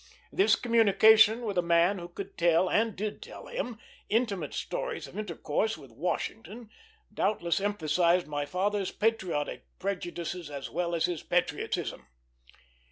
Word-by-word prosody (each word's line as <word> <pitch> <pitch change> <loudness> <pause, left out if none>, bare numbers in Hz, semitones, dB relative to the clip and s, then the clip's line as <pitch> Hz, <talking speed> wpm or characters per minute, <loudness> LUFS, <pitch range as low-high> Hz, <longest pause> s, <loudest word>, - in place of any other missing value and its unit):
This 390 +3 +4
communication 220 0 +5
with 200 -5 -1
a - - +4
man 170 +3 +3
who 175 - -7
could 195 +3 -8
tell, 170 +1 +3
and 220 +3 +1
did 210 +2 -4
tell 470 +2 -10
him, 250 - -4 0.3
intimate 220 -4 0
stories - - -3
of - - -13
intercourse 210 +1 -2
with 135 -5 -14
Washington 210 - -4 0.4
doubtless 175 -4 0
emphasized 175 -3 +2
my 145 -1 -3
father's 195 +3 0
patriotic 195 -9 -1
prejudices 175 -3 -4
as 140 -2 -6
well 170 +1 -1
as 165 - +2
his 175 -4 -3
patriotism. 175 - -1
190 Hz, 135 wpm, -29 LUFS, 170-220 Hz, 0.4 s, communication